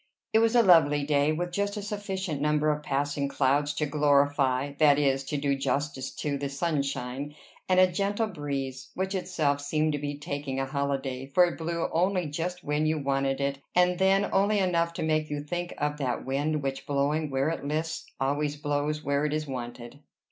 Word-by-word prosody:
It 220 Hz, -, +6 dB
was 225 Hz, +1 st, +3 dB
a 240 Hz, -, +6 dB
lovely 150 Hz, -6 st, +5 dB
day, 145 Hz, +1 st, +2 dB
with 175 Hz, +3 st, -2 dB
just 200 Hz, +3 st, -1 dB
a 205 Hz, -, -4 dB
sufficient 195 Hz, -7 st, -3 dB
number 150 Hz, 0 st, +2 dB
of 150 Hz, 0 st, -2 dB
passing 145 Hz, 0 st, -1 dB
clouds 140 Hz, +1 st, +1 dB
to 150 Hz, -, 0 dB
glorify 140 Hz, -2 st, +2 dB
that 145 Hz, -2 st, +6 dB
is, 135 Hz, -2 st, +2 dB
to 145 Hz, -, -2 dB
do 140 Hz, 0 st, +1 dB
justice 135 Hz, -1 st, -2 dB
to 140 Hz, -2 st, -2 dB
the 140 Hz, 0 st, -2 dB
sunshine, 140 Hz, -2 st, -2 dB, 0.3 s
and 185 Hz, 0 st, +4 dB
a 185 Hz, -, +8 dB
gentle 200 Hz, +4 st, 0 dB
breeze, 140 Hz, -8 st, -4 dB
which 190 Hz, +1 st, -2 dB
itself 160 Hz, -7 st, 0 dB
seemed 155 Hz, +2 st, 0 dB
to 145 Hz, -, -2 dB
be 145 Hz, 0 st, -4 dB
taking 140 Hz, -2 st, -4 dB
a 135 Hz, -, 0 dB
holiday, 135 Hz, -1 st, -2 dB
for 175 Hz, +6 st, +5 dB
it 175 Hz, -, -4 dB
blew 170 Hz, +1 st, -1 dB
only 180 Hz, +1 st, +1 dB
just 170 Hz, +4 st, -4 dB
when 150 Hz, +1 st, 0 dB
you 155 Hz, 0 st, +1 dB
wanted 135 Hz, -1 st, 0 dB
it, 140 Hz, 0 st, -1 dB, 0.2 s
and 180 Hz, 0 st, +3 dB
then 195 Hz, +1 st, +3 dB
only 200 Hz, +2 st, +3 dB
enough 170 Hz, -3 st, +1 dB
to -, -, -4 dB
make 155 Hz, -1 st, 0 dB
you 145 Hz, 0 st, -2 dB
think 175 Hz, +3 st, -4 dB
of 150 Hz, 0 st, -1 dB
that 130 Hz, -4 st, -2 dB
wind 145 Hz, +3 st, -1 dB
which, 135 Hz, 0 st, -3 dB
blowing 145 Hz, +2 st, 0 dB
where 135 Hz, +2 st, +1 dB
it 165 Hz, -, -4 dB
lists, 155 Hz, +3 st, -3 dB
always 145 Hz, +2 st, 0 dB
blows 145 Hz, +1 st, -2 dB
where 140 Hz, +1 st, 0 dB
it 150 Hz, 0 st, 0 dB
is 155 Hz, 0 st, -2 dB
wanted. 120 Hz, -1 st, -7 dB
145 Hz, 195 wpm, -28 LUFS, 140-170 Hz, 0.3 s, a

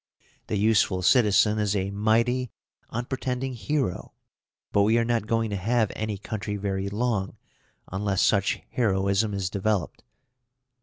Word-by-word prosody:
The 105 Hz, -, -1 dB
useful 100 Hz, -3 st, +2 dB
citizen 105 Hz, -1 st, +4 dB
is 105 Hz, -1 st, 0 dB
a 95 Hz, 0 st, -1 dB
mighty, 115 Hz, +5 st, +1 dB, 0.4 s
unpretending 130 Hz, +2 st, -3 dB
hero; 125 Hz, -4 st, -2 dB, 0.6 s
but 100 Hz, -, +3 dB
we 110 Hz, +3 st, +4 dB
are 115 Hz, -, +2 dB
not 115 Hz, -3 st, 0 dB
going 115 Hz, -1 st, 0 dB
to -, -, -1 dB
have 110 Hz, +3 st, +1 dB
any 110 Hz, -2 st, -3 dB
country 105 Hz, +1 st, -4 dB
very 100 Hz, -1 st, -2 dB
long, 105 Hz, -2 st, -1 dB, 0.5 s
unless 95 Hz, 0 st, 0 dB
such 100 Hz, -2 st, +2 dB
heroism 100 Hz, -2 st, +1 dB
is 95 Hz, -2 st, -1 dB
developed. 100 Hz, -3 st, -1 dB
105 Hz, 135 wpm, -26 LUFS, 100-115 Hz, 0.6 s, citizen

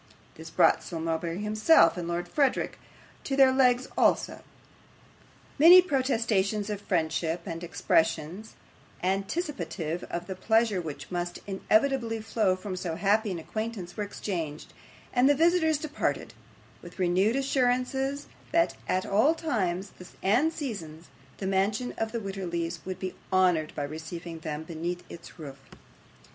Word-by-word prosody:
This -, -, -10 dB
brought -, -, +4 dB
Sir 165 Hz, -, -6 dB
Mulberry 165 Hz, +1 st, -2 dB
himself 215 Hz, +9 st, +5 dB
and 175 Hz, -2 st, -4 dB
Lord 175 Hz, +1 st, -2 dB
Verisopht 275 Hz, +7 st, +1 dB, 0.6 s
on 270 Hz, -, 0 dB
their 265 Hz, -1 st, +7 dB
legs 255 Hz, -1 st, +3 dB
also. -, -, +2 dB, 1.2 s
Many 345 Hz, +5 st, +10 dB
protestations 225 Hz, -, +1 dB
of 205 Hz, -1 st, -4 dB
friendship, 165 Hz, -2 st, -1 dB
and 165 Hz, -2 st, -5 dB
expressions 165 Hz, +3 st, 0 dB, 0.5 s
anticipative 190 Hz, -, -2 dB
of 170 Hz, 0 st, -5 dB
the 190 Hz, -, -5 dB
pleasure 220 Hz, 0 st, +2 dB
which 155 Hz, 0 st, -8 dB
must 175 Hz, 0 st, -3 dB
inevitably 225 Hz, +4 st, +1 dB
flow 215 Hz, -3 st, +1 dB
from 185 Hz, 0 st, -6 dB
so 180 Hz, -3 st, -3 dB
happy 205 Hz, +4 st, +2 dB
an 185 Hz, -, -3 dB
acquaintance, 205 Hz, 0 st, -5 dB
were 210 Hz, -, -2 dB
exchanged, 170 Hz, -7 st, -5 dB, 0.4 s
and 250 Hz, +2 st, +4 dB
the 290 Hz, -, +5 dB
visitors 320 Hz, 0 st, +3 dB
departed, 300 Hz, 0 st, -3 dB, 0.5 s
with -, -, -12 dB
renewed 190 Hz, +5 st, +2 dB
assurances 270 Hz, +1 st, 0 dB, 0.3 s
that 335 Hz, 0 st, +2 dB
at 185 Hz, 0 st, 0 dB
all 225 Hz, +11 st, +3 dB
times 200 Hz, -, -2 dB, 0.3 s
and 245 Hz, +12 st, +3 dB
seasons 180 Hz, -, -6 dB, 0.3 s
the 195 Hz, -, -5 dB
mansion 200 Hz, +6 st, 0 dB
of 225 Hz, 0 st, -1 dB
the 235 Hz, -, -2 dB
Wititterlys 175 Hz, -5 st, -4 dB
would 185 Hz, -, -4 dB
be 185 Hz, -1 st, -4 dB, 0.2 s
honoured 180 Hz, -5 st, +3 dB
by -, -, -2 dB
receiving 160 Hz, +3 st, -7 dB
them 155 Hz, -1 st, -5 dB
beneath 170 Hz, +2 st, -4 dB
its 170 Hz, -, -11 dB
roof. 140 Hz, -4 st, -9 dB
195 Hz, 135 wpm, -28 LUFS, 170-245 Hz, 1.2 s, Many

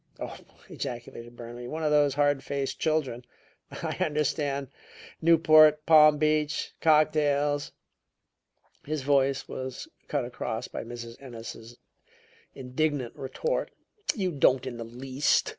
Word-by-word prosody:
"Oh!" -, -, -5 dB, 0.3 s
ejaculated 120 Hz, -1 st, -7 dB
Burnaby. 120 Hz, +1 st, -8 dB
"One 160 Hz, +4 st, -4 dB
of 150 Hz, -, +1 dB
those 145 Hz, -2 st, +3 dB
hard 145 Hz, -1 st, +2 dB
faced 140 Hz, -1 st, -3 dB
children! 145 Hz, -6 st, 0 dB, 0.5 s
I -, -, -5 dB
understand 150 Hz, -4 st, -1 dB, 0.5 s
Newport, 155 Hz, -2 st, +6 dB
Palm 155 Hz, -2 st, +7 dB
Beach, 150 Hz, 0 st, 0 dB
cocktails 150 Hz, -2 st, +2 dB, 0.6 s
" -, -, -42 dB
His 155 Hz, -3 st, -1 dB
voice 140 Hz, -1 st, +2 dB
was 130 Hz, -, -6 dB, 0.2 s
cut 145 Hz, -4 st, -1 dB
across 115 Hz, -2 st, -4 dB
by -, -, -6 dB
Mrs. 115 Hz, 0 st, -9 dB
Ennis's 115 Hz, -2 st, -9 dB, 0.8 s
indignant 135 Hz, -1 st, -2 dB
retort. 475 Hz, -, -2 dB, 0.5 s
"You 190 Hz, -4 st, -1 dB
don't 135 Hz, -3 st, +3 dB
in 125 Hz, -2 st, -5 dB
the 115 Hz, -, -5 dB
least!" 130 Hz, +4 st, 0 dB
140 Hz, 120 wpm, -28 LUFS, 125-155 Hz, 0.8 s, Palm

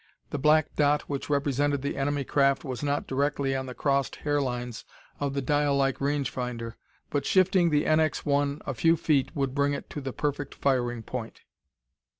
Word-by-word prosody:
The 145 Hz, -, -2 dB
black 155 Hz, +2 st, +3 dB
dot 145 Hz, 0 st, +3 dB
which 140 Hz, 0 st, -5 dB
represented 145 Hz, -1 st, +1 dB
the 140 Hz, -, -2 dB
enemy 145 Hz, 0 st, 0 dB
craft 140 Hz, 0 st, +2 dB
was 130 Hz, -3 st, -5 dB
not 145 Hz, 0 st, -1 dB
directly 135 Hz, 0 st, 0 dB
on 130 Hz, 0 st, -3 dB
the 125 Hz, -, -7 dB
crossed 140 Hz, -2 st, 0 dB
hair 145 Hz, -1 st, 0 dB
lines 125 Hz, -3 st, -4 dB, 0.4 s
of 140 Hz, -1 st, -2 dB
the 140 Hz, -, -1 dB
dial 145 Hz, +1 st, +2 dB
like 135 Hz, -1 st, +1 dB
range 140 Hz, -1 st, 0 dB
finder, 120 Hz, -3 st, -4 dB, 0.4 s
but 145 Hz, -2 st, 0 dB
shifting 185 Hz, -2 st, +4 dB
the 150 Hz, -1 st, +2 dB
NX 155 Hz, 0 st, +1 dB
1 140 Hz, 0 st, 0 dB
a 135 Hz, -, -2 dB
few 165 Hz, +7 st, +3 dB
feet 145 Hz, -5 st, +1 dB
would 135 Hz, -3 st, -1 dB
bring 140 Hz, 0 st, +1 dB
it -, -, -8 dB
to 145 Hz, -, -5 dB
the 135 Hz, -1 st, -4 dB
perfect 145 Hz, +1 st, -3 dB
firing 120 Hz, -4 st, 0 dB
point. 115 Hz, -1 st, -6 dB
140 Hz, 185 wpm, -27 LUFS, 135-145 Hz, 0.4 s, shifting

